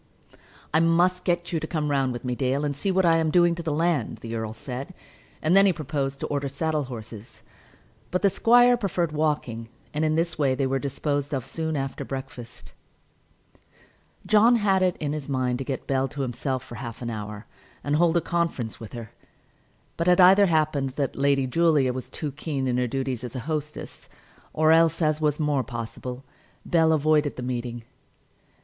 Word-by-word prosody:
"I 160 - +5
must 175 +2 +2
get 175 -1 -1
you 165 - +1
to 155 - -5
come 150 -3 -1
round 135 -2 +1
with 120 +1 -6
me, 125 - -1
Dale, 135 +3 0
and 145 -1 -2
see 170 +8 -2
what 190 -1 +2
I 165 -1 +5
am 160 -1 +1
doing 175 +1 +4
to 170 - -5
the 160 -2 -2
land," 160 -4 0
the 115 0 -6
earl 110 -1 -3
said. 130 +9 -7 0.5
And 160 +4 +3
then 195 0 +7
he - - +5
proposed 140 -3 -3
to - - -1
order 140 -1 -2
saddle 150 +1 -1
horses. 110 -2 -10 0.7
But 180 - -1
the 200 - +6
squire 245 +3 +5
preferred 180 -7 -1
walking, 145 -7 -2 0.2
and 150 +1 -1
in 155 0 +2
this 165 0 -1
way 135 -3 +2
they 135 - 0
were 135 +1 0
disposed 145 +1 -2
of 130 - -3
soon 160 -1 -3
after 135 -1 -3
breakfast. 130 -3 -8 1.5
John 220 +3 +5
had 200 -4 +2
it 185 -2 +1
in 145 -1 -3
his 150 -2 -5
mind 130 -2 0
to - - -2
get 135 -1 -4
Bell 135 0 0
to 145 0 -6
himself 130 +1 -3
for 120 - -12
half 120 -1 -7
an 120 - -3
hour, 105 -1 -6 0.4
and 145 +1 0
hold 170 +1 +3
a - - +2
conference 165 -11 -2
with 115 - -10
her; 115 -3 -8 0.9
but 170 - -1
it 180 0 +5
either 195 +2 +7
happened 155 -4 +1
that 140 -2 -2
Lady 140 -1 +2
Julia 145 -2 +2
was 130 0 -6
too 150 -2 -4
keen 140 -1 -3
in 125 -1 0
her 125 0 +1
duties 130 -1 -3
as 125 -1 -7
a - - -2
hostess, 150 +1 -5 0.4
or 155 0 +3
else, 165 0 +4
as 155 -2 +1
was 150 -1 +1
more 145 -3 +1
possible, 120 +2 -6 0.4
Bell 160 -2 +3
avoided 150 -3 +2
the 125 - -6
meeting. 120 -1 -4
145 Hz, 195 wpm, -25 LUFS, 130-165 Hz, 1.5 s, then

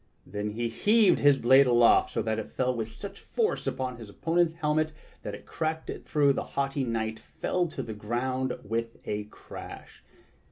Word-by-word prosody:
Then 105 0 -3
he 115 +3 -2
heaved 210 - +4
his 145 -1 +5
blade 130 +2 +6
aloft 120 -1 +5
so - - -2
that 110 0 -1
it 110 - -6
fell 130 -1 +1
with 110 -2 -2
such 195 - -9
force 450 -2 -1
upon 130 -1 -2
his 115 -3 -10
opponent's 165 +8 +1
helmet 155 -1 0 0.3
that 105 - -5
it - - -13
cracked 160 0 -3
it - - -8
through 145 -2 +3
and 140 - +2
the - - -3
haughty 140 0 0
knight 110 -2 -2
fell 180 -1 -2
to 160 - -5
the 110 - -6
ground 125 +5 -2
with 115 +2 -3
a 105 0 -2
crash. 105 - -11
130 Hz, 190 wpm, -28 LUFS, 110-155 Hz, 0.3 s, blade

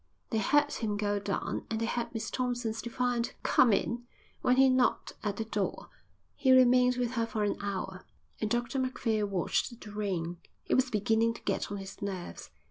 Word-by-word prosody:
They 220 - +1
heard 290 +7 +3
him 210 -3 -2
go 205 -1 0
down 200 -1 -3
and 220 - -1
they 230 - 0
heard 235 +1 -2
Miss 225 -2 -4
Thompson's 245 -3 -1
defiant 240 0 -1
"Come 250 -3 +5
in" 240 +4 0 0.3
when 250 - +4
he 265 +1 +6
knocked 255 -1 +2
at 205 -2 -2
the 225 - -2
door. 205 -3 -3 0.5
He 265 - +3
remained 250 -1 +6
with 245 -1 0
her 230 -2 0
for 220 -2 -1
an 205 - +1
hour. 190 -2 -4 0.4
And 215 - -1
Dr 240 +4 0
Macphail 225 -5 0
watched 200 +5 -1
the 210 - -10
rain. 185 -5 -2 0.3
It - - 0
was 260 0 +3
beginning 225 +1 +2
to - - -11
get 195 0 -1
on 205 - -3
his 195 0 -9
nerves. 190 -3 -5
225 Hz, 190 wpm, -30 LUFS, 205-250 Hz, 0.5 s, he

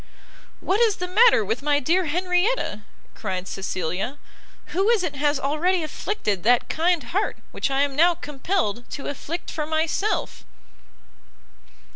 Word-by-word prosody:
"What 390 +3 +1
is 445 -4 +4
the 360 - -4
matter 415 - +5
with 220 +6 -2
my 290 0 +2
dear 345 +7 +2
Henrietta?" 360 - 0 0.3
cried 185 -3 -4
Cecilia; 190 - -3 0.6
"who 390 +5 +2
is 455 -5 +3
it 310 -5 -3
has 290 0 +1
already 320 +6 +1
afflicted 260 - -2
that 240 +4 +3
kind 335 -1 +1
heart 375 - -1
which - - -1
I 270 +1 +2
am 280 -1 -2
now 340 +3 +5
compelled 285 - -2
to 280 - -6
afflict 320 +4 -5
for 305 -1 -3
myself?" 320 +6 -1
310 Hz, 140 wpm, -24 LUFS, 265-360 Hz, 0.6 s, matter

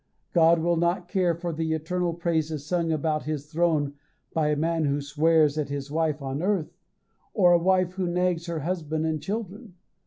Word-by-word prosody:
God 170 0 +5
will 170 +1 +1
not 175 +1 0
care 180 -3 +1
for 170 0 -4
the 160 0 -1
eternal 170 +2 -1
praises 160 -3 -1
sung 170 0 0
about 155 0 -1
his 150 -2 -3
throne 155 -2 0 0.4
by 160 -2 +1
a 150 - +2
man 165 +1 0
who 140 0 0
swears 155 +1 +2
at 145 -2 -2
his 140 0 -5
wife 155 -2 0
on 135 +2 -3
earth, 185 -4 -1 0.6
or 180 -4 +5
a 175 - +5
wife 185 0 +2
who 185 -1 -2
nags 175 -1 0
her 165 -2 -3
husband 160 -1 -2
and 155 -2 -1
children. 205 0 -5
165 Hz, 185 wpm, -26 LUFS, 155-175 Hz, 0.6 s, God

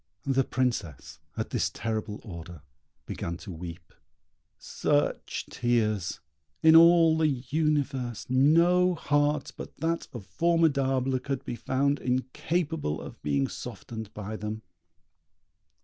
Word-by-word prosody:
The 135 -1 +2
Princess, 120 - -2 0.2
at - - -3
this - - +1
terrible 110 -1 -4
order, 85 -5 -9 0.4
began 85 0 -4
to 100 - -9
weep. 85 0 -9 0.6
Such 145 -1 -1
tears! 110 -6 0 0.4
In 160 0 +8
all 165 -1 +7
the 160 -1 +3
universe 135 -3 -1
no 170 +7 +4
heart 145 -2 +1
but - - -9
that 165 +1 -1
of 115 -6 -8
Formidable 135 - +2
could 135 +1 -4
be 120 - -4
found 140 +3 0
incapable 135 - -1
of - - -10
being 70 -2 +1
softened 110 -2 -7
by 105 +1 -5
them. 105 +1 -5
130 Hz, 115 wpm, -28 LUFS, 105-150 Hz, 0.6 s, In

